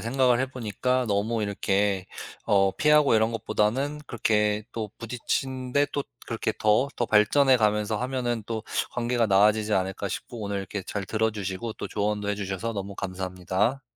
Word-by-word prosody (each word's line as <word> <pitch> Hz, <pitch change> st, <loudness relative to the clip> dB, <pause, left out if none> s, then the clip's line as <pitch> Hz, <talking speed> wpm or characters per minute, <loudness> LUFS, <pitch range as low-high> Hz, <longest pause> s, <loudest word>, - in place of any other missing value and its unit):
생각을 125 Hz, +1 st, +2 dB
해 130 Hz, -, +1 dB
보니까 125 Hz, +1 st, -1 dB
너무 110 Hz, +2 st, 0 dB
이렇게 100 Hz, -1 st, 0 dB, 0.4 s
어 95 Hz, -1 st, +3 dB
피하고 150 Hz, -1 st, +5 dB
이런 110 Hz, +1 st, +3 dB
것보다는 115 Hz, +6 st, 0 dB
그렇게 105 Hz, -3 st, +1 dB
또 110 Hz, -2 st, -4 dB
부딪히는데 130 Hz, +3 st, -1 dB
또 145 Hz, -, -1 dB, 0.2 s
그렇게 115 Hz, -1 st, -2 dB
더, 110 Hz, +6 st, +3 dB
더 120 Hz, -, 0 dB
발전해 130 Hz, +6 st, +5 dB
가면서 105 Hz, -1 st, +1 dB
하면은 125 Hz, -2 st, -2 dB
또 110 Hz, -1 st, -3 dB, 0.3 s
'관계가 120 Hz, -1 st, +1 dB
나아지지 105 Hz, +2 st, +3 dB
않을까?' 95 Hz, +1 st, -1 dB
싶고 115 Hz, +4 st, -6 dB
오늘 100 Hz, -1 st, -2 dB
이렇게 95 Hz, +1 st, -5 dB
잘 100 Hz, +1 st, -4 dB
들어 110 Hz, +3 st, 0 dB
주시고 105 Hz, +1 st, -4 dB
또 -, -, -5 dB
조언도 105 Hz, 0 st, -1 dB
해 105 Hz, -, +1 dB
주셔서 100 Hz, +2 st, -3 dB
너무 100 Hz, -1 st, -5 dB
감사합니다. 95 Hz, +6 st, -2 dB
110 Hz, 365 characters per minute, -26 LUFS, 100-120 Hz, 0.4 s, 피하고